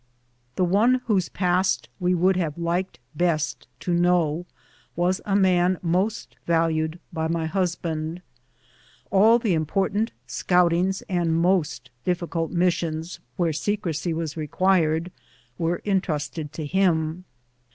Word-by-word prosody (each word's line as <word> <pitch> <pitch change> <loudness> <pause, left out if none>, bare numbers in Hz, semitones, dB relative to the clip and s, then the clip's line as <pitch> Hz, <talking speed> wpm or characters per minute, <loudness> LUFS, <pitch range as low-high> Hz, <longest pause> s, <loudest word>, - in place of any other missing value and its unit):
The 185 - +2
one 225 +8 +3
whose 195 -6 +1
past 185 0 +1
we 180 0 +2
would 185 +2 +3
have 165 -4 -2
liked 170 +2 -2 0.2
best 155 -9 0
to 175 - -1
know 175 -1 +2 0.5
was 180 +2 +1
a 195 - 0
man 185 -2 +3
most 185 +6 -1
valued 165 0 +1
by 160 -1 -1
my 165 0 -1
husband. 165 -1 -2 0.9
All 215 +4 +6
the 225 -6 0
important 195 +7 0
scoutings 180 +2 +1
and 170 -3 0
most 165 -8 0
difficult 170 -2 -1
missions 170 -2 -1 0.2
where 170 -4 +1
secrecy 170 -1 -2
was 160 -2 -3
required 165 +1 +1 0.5
were 170 +1 0
intrusted 160 -6 -1
to 155 -1 -5
him. 170 0 +1
175 Hz, 120 wpm, -24 LUFS, 160-185 Hz, 0.9 s, All